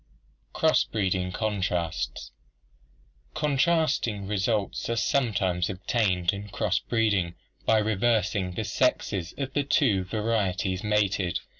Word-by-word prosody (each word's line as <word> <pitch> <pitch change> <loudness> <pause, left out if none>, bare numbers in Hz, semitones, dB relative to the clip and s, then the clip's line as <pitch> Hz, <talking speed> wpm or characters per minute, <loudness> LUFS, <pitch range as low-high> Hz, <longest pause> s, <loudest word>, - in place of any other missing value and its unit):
Cross - - +3
breeding 95 -3 -1
Contrasts. 95 -5 -2 0.5
— - - -35
Contrasting 150 - +1
results 105 +2 -1
are 115 - 0
sometimes 95 -9 +1
obtained 95 -2 0
in 100 +1 -7
cross - - 0
breeding 100 -7 0 0.3
by 110 - +5
reversing 105 -3 +1
the 110 - -2
sexes 100 -5 0
of 135 -1 -4
the 145 - +1
two 130 - +2
vari 105 0 0
eties 95 0 -2
mated. 100 -4 +1
105 Hz, 115 wpm, -27 LUFS, 95-115 Hz, 0.5 s, by